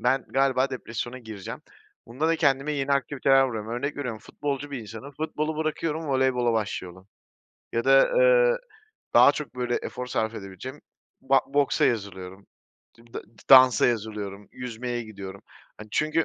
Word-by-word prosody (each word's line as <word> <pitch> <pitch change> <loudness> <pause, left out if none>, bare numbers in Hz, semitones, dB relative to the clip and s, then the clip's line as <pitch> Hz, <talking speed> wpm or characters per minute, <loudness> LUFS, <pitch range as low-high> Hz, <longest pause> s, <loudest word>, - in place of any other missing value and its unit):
ben 130 0 +1
galiba 135 0 +2
depresyona 120 0 -5
gireceğim. 110 -5 -8 0.5
Bunda 130 +8 -1
da 165 - +2
kendime 140 -1 +1
yeni 140 -1 -1
aktiviteler 135 -1 +3
buluyorum. 110 -2 -5
Örnek 140 +5 -3
veriyorum, 125 -6 -4
futbolcu 145 0 -4
bir 140 - -4
insanım, 115 +5 -9
futbolu 155 +1 -3
bırakıyorum, 155 0 -2
voleybola 130 -3 +1
başlıyorum 95 -3 -4 0.6
ya 115 +1 -1
da, 135 0 +6
eee, - - +5 0.6
daha - - +8
çok, 145 -2 -7
böyle, 125 -1 -1
efor 125 - -5
sarf 110 -2 -1
edebileceğim 100 +9 -8 0.4
ba 135 0 +4
boksa 140 0 +2
yazılıyorum. 95 -4 -3 0.5
Dimda 115 0 -9
d 105 0 -22
dansa 130 -3 +8
yazılıyorum, 105 -3 -3
yüzmeye 120 0 -5
gidiyorum. 100 -3 -9 0.4
Hani, 110 - -10
çünkü 155 +1 +1
125 Hz, 145 wpm, -26 LUFS, 110-140 Hz, 0.6 s, daha